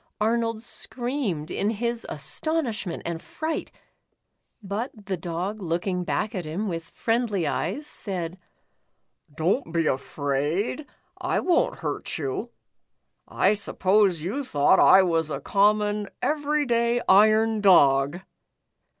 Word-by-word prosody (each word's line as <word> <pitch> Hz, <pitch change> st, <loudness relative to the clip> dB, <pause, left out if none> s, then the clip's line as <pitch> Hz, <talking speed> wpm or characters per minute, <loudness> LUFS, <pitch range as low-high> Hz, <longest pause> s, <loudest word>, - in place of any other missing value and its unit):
Arnold 230 Hz, 0 st, 0 dB
screamed 240 Hz, -, -3 dB
in 205 Hz, -, 0 dB
his 235 Hz, +2 st, -2 dB
astonishment 220 Hz, -, -2 dB
and 170 Hz, -1 st, -3 dB
fright, 315 Hz, 0 st, -4 dB, 0.9 s
but 205 Hz, +6 st, -3 dB, 0.2 s
the 195 Hz, -1 st, -1 dB
Dog 180 Hz, +5 st, -4 dB
looking 180 Hz, +1 st, -1 dB
back 210 Hz, +5 st, -2 dB
at 185 Hz, -4 st, -3 dB
him 170 Hz, +7 st, -3 dB
with 165 Hz, -3 st, -4 dB
friendly 225 Hz, -6 st, 0 dB
eyes, 190 Hz, -, -2 dB
said: 185 Hz, -, -4 dB, 0.5 s
" 145 Hz, -, -34 dB
Don't 170 Hz, -, 0 dB
be 165 Hz, -1 st, +1 dB
afraid, 145 Hz, -, -1 dB, 0.3 s
I -, -, 0 dB
won't 350 Hz, -3 st, +1 dB
hurt -, -, -3 dB
you. 150 Hz, -, -3 dB, 0.8 s
I 195 Hz, -, +2 dB
suppose 195 Hz, -4 st, +2 dB
you 230 Hz, +12 st, -2 dB
thought 145 Hz, -, +3 dB
I 190 Hz, 0 st, +7 dB
was 165 Hz, -3 st, 0 dB
a 140 Hz, -, -3 dB
common, 205 Hz, +3 st, +1 dB
every 300 Hz, 0 st, 0 dB
day 235 Hz, -1 st, +2 dB
iron 215 Hz, +2 st, +5 dB
dog?" 145 Hz, -4 st, +5 dB
200 Hz, 120 wpm, -25 LUFS, 165-230 Hz, 0.9 s, I